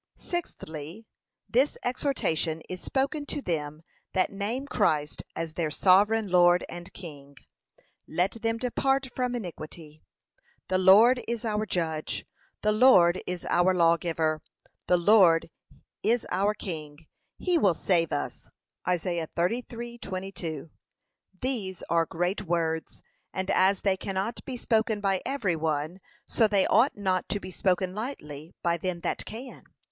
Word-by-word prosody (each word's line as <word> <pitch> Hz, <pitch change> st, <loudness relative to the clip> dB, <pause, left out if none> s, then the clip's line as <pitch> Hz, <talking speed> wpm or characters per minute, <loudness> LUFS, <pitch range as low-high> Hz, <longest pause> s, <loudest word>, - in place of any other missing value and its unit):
Sixthly, 175 Hz, -, -6 dB, 0.4 s
This 260 Hz, +5 st, +2 dB
exhortation 170 Hz, -, 0 dB
is 185 Hz, -1 st, -6 dB
spoken 280 Hz, +2 st, -1 dB
to -, -, -2 dB
them 155 Hz, -, -3 dB, 0.3 s
that 185 Hz, -1 st, +2 dB
name 210 Hz, +7 st, -3 dB
Christ 150 Hz, -, 0 dB
as 165 Hz, -1 st, -4 dB
their 165 Hz, -2 st, -1 dB
Sovereign 205 Hz, +7 st, +4 dB
Lord 175 Hz, 0 st, +5 dB
and 175 Hz, +1 st, -9 dB
King: 145 Hz, -6 st, -11 dB, 0.7 s
let 180 Hz, +4 st, +1 dB
them 225 Hz, 0 st, 0 dB
'depart 265 Hz, +2 st, 0 dB
from 250 Hz, -1 st, -1 dB
iniquity.' 160 Hz, -6 st, -8 dB, 0.7 s
'The 185 Hz, -, +2 dB
Lord 220 Hz, +7 st, +7 dB
is 235 Hz, -1 st, -3 dB
our 215 Hz, -1 st, -1 dB
judge, 160 Hz, -4 st, -2 dB, 0.4 s
the 210 Hz, -, +3 dB
Lord 200 Hz, -7 st, +6 dB
is 180 Hz, -1 st, -4 dB
our 180 Hz, +2 st, +3 dB
Lawgiver, 165 Hz, -2 st, +2 dB, 0.5 s
the 180 Hz, -, +4 dB
Lord 175 Hz, -3 st, +5 dB, 0.5 s
is 235 Hz, +2 st, +1 dB
our 200 Hz, +3 st, +1 dB
King; 155 Hz, -5 st, -7 dB, 0.3 s
he 355 Hz, -2 st, +1 dB
will 195 Hz, -, +3 dB
save 170 Hz, -2 st, +1 dB
us.' -, -, -4 dB, 0.4 s
(Isa. 175 Hz, -2 st, -1 dB
33:22) 190 Hz, -, -4 dB, 0.7 s
[These] 210 Hz, -9 st, -2 dB
are 165 Hz, -1 st, +3 dB
great 175 Hz, +5 st, -1 dB
words; 160 Hz, -1 st, -1 dB, 0.3 s
and 190 Hz, 0 st, -1 dB
as 190 Hz, +1 st, +3 dB
they 195 Hz, -2 st, +2 dB
cannot 195 Hz, +4 st, -3 dB
be 260 Hz, -2 st, -4 dB
spoken 220 Hz, -2 st, +1 dB
by 195 Hz, -2 st, +1 dB
every 230 Hz, -11 st, 0 dB
one, 155 Hz, +2 st, -2 dB, 0.3 s
so 225 Hz, -, +3 dB
they 200 Hz, -2 st, +3 dB
ought 230 Hz, +5 st, +3 dB
not 190 Hz, -3 st, 0 dB
to 205 Hz, -, 0 dB
be 185 Hz, -, -8 dB
spoken 185 Hz, 0 st, 0 dB
lightly 165 Hz, -, -6 dB
by 170 Hz, 0 st, +2 dB
them 175 Hz, 0 st, -3 dB
that -, -, -2 dB
can. 245 Hz, +4 st, -8 dB
185 Hz, 135 wpm, -28 LUFS, 165-225 Hz, 0.7 s, Lord